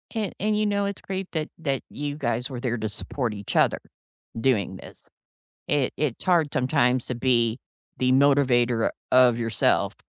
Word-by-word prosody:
An 215 -4 -1
and 210 +2 +1
you 215 - +1
know, 200 -1 0
it's 200 -1 -4
great 190 -1 -5
that 155 -2 -2
that 140 -5 -2
you 145 0 -4
guys 125 -4 -2
were 130 -3 -6
there 120 -1 -2
to 110 -1 -3
support 115 +2 -2
each 100 -1 -6
other - - +3 0.6
doing 115 -6 +1
this. - - -13 0.6
It 140 -3 0
it's 145 -6 -2
hard 170 -5 +3
sometimes 125 -1 +1
to 125 - -3
be 120 -1 +1 0.4
the 130 0 +2
motivator 130 -4 +3 0.2
of 125 -2 +6
yourself, 115 -3 +1
130 Hz, 165 wpm, -25 LUFS, 120-155 Hz, 0.6 s, of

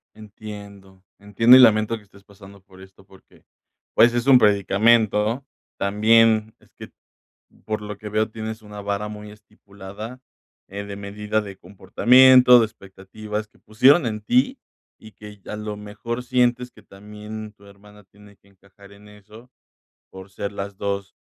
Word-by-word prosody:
Entiendo, 100 -3 -13
entiendo 115 +5 +4
y - - +6
lamento 110 -2 +4
que 105 - -18
estés 100 0 -22
pasando 100 -1 -17
por 95 -1 -19
esto 95 0 -18
porque, 95 0 -23 0.5
pues, 120 +1 +5
es 120 +2 -2
un 135 -2 +7
predicamento. 105 +2 +2 0.4
También 110 +2 +2
es - - -27
que, - - -12 0.8
por 110 -1 -4
lo 105 -1 -8
que 105 - -9
veo, 110 +1 -1
tienes 110 0 -8
una 105 -1 -11
vara 100 +1 -4
muy 105 0 -10
estipulada, 105 +2 -12 0.5
eh, 100 +1 -7
de 100 -1 -9
medida 105 +2 -4
de 100 -2 -10
comportamiento, 125 +7 +5
de 115 - +3
expectativas 105 +1 -9
que - - -29
pusieron 130 +8 +3
en 110 -2 -5
ti, 260 - 0 0.4
y 110 - -16
que 105 -1 -14
a - - -5
lo 105 0 -6
mejor 105 +4 -7
sientes 125 0 0
que - - -20
también 105 +2 -11
tu 100 -1 -22
hermana 105 +1 -19
tiene 100 +1 -21
que 100 - -29
encajar 100 +1 -21
en 105 +1 -18
eso 105 +4 -17 0.6
por 95 0 -12
ser 100 +1 -6
las 100 0 -7
2 100 -1 -5
105 Hz, 160 wpm, -21 LUFS, 100-110 Hz, 0.8 s, un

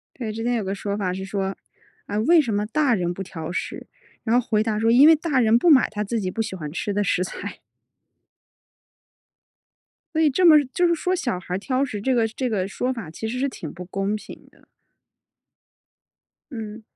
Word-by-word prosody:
对， 230 -5 -4
之 225 +1 -5
前 245 0 +1
有 225 - -1
个 195 +1 -2
说 200 0 -3
法 185 -3 -1
是 190 +1 -5
说， 195 0 -3 0.5
啊， 205 - -2
为 330 +9 +5
什 240 -7 -1
么 205 +1 0
大 275 +1 +2
人 175 -3 -1
不 195 - -5
挑 165 -4 -7
食？ 180 - -5 0.4
然 235 +1 +3
后 250 - -1
回 215 -1 +2
答 215 -1 -1
说 225 +1 +2
因 265 +6 +7
为 320 - +7
大 295 -4 0
人 225 -1 +4
不 340 - +2
买 280 -5 +6
他 210 0 -3
自 230 +2 -2
己 185 -2 -2
不 225 - -5
喜 220 -3 -5
欢 155 -5 -6
吃 200 +6 -3
的 205 - 0
食 185 -2 +1
材。 - - -7 2.5
所 315 - +1
以 315 - +5
这 290 +7 +1
么 310 -4 +8
就 355 - +3
是 340 - +3
说 365 +3 -1
小 240 - -2
孩 180 0 -6
儿 - - 0
挑 255 +6 -1
食 235 -7 -2
这 260 +6 0
个 230 -2 +2
这 250 +3 -3
个 195 -3 -1
说 250 +5 -2
法 210 -11 -7
其 220 - -6
实 240 +3 -3
是 275 +2 0
挺 160 - -7
不 180 - -9
公 195 +2 -2
平 215 - -9
的。 - - -25 1.9
嗯。 220 -2 -7
220 Hz, 235 characters per minute, -23 LUFS, 195-255 Hz, 2.5 s, 么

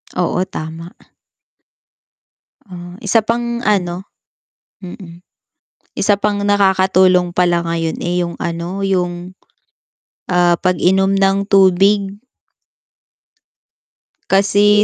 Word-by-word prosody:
Oo, 180 0 -1
tama. 165 -1 -8 1.8
Ah, 175 -2 -11
isa 220 +3 +2
pang 235 +2 -3
ano, 185 -5 -1 0.8
mm. 175 -2 -11 0.8
Isa 205 - +2
pang 205 0 -2
nakakatulong 190 -3 +2
pala 175 -1 +2
ngayon, 165 -1 -2
eh, 175 0 -1
yung 170 - -5
ano, 170 +3 -4
yung, 180 -1 -3 0.9
ah, 175 -1 +3
pag-inom 190 +2 +1
ng 195 0 +1
tubig. 195 +1 +2 2.1
Kasi 205 +2 +3
185 Hz, 85 wpm, -16 LUFS, 175-200 Hz, 2.1 s, ah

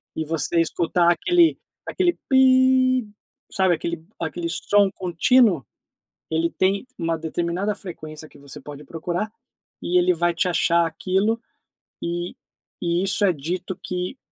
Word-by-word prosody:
E 160 - -2
você 165 +2 0
escutar 170 +1 +2
aquele 345 - +3 0.3
aquele 355 -2 +1
"piiiii", 260 -2 +4 0.4
sabe 190 -3 +2
aquele 165 0 -5
aquele 170 +1 -3
som 200 +3 +2
contínuo, 180 - +2 0.7
ele 165 +1 +1
tem 195 +5 0
uma 165 0 -1
determinada 170 +5 -2
frequência, 155 -5 -9
que - - -18
você 140 -1 -11
pode 145 0 -10
procurar, 175 +7 -3 0.5
e 180 +1 +2
ele 180 0 +3
vai 175 +1 +1
te 180 +2 +1
achar 170 -1 +2
aquilo 190 +7 0 0.6
e 175 +1 -3 0.5
e 170 +1 0
isso 200 +2 +1
é 185 - +3
dito 175 +5 -4
que 180 +7 -4
175 Hz, 135 wpm, -23 LUFS, 165-205 Hz, 0.7 s, piiiii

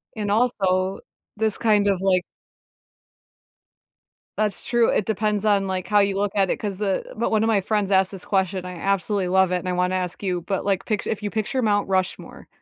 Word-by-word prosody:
And 210 -2 -2
also, 195 -5 +1 0.4
this 220 0 0
kind 210 -3 +3
of, 195 -2 +2
like 185 -2 +3 2.2
That's 210 -3 -1
true, 235 -1 +2
it 205 - +1
depends 210 -1 -1
on, 200 -2 +3
like, 185 -1 -3
how 210 - +2
you 200 -1 +3
look 200 0 0
at 195 -2 +2
it, - - -1
'cause, 200 -3 -5
uh 195 -3 0
but 230 - -1
1 220 -1 +2
of - - +2
my 220 -3 +3
friends 205 0 -1
asked 190 -1 +3
this 195 -2 -9
question, 190 -1 0
and 180 - -8
I 180 - -7
absolutely 195 0 0
love 190 0 +3
it, 180 - +2
and 180 - -6
I - - 0
wanna 180 +1 0
ask 180 -1 -3
you, 180 -3 -1
but, 190 +3 -2
like, 195 -2 0
pictu 215 -3 -2
if 215 -1 -3
you 205 - -2
picture 230 +4 -1
Mount 205 -2 +1
Rushmore, 185 -1 -2
200 Hz, 215 wpm, -23 LUFS, 185-210 Hz, 2.2 s, kind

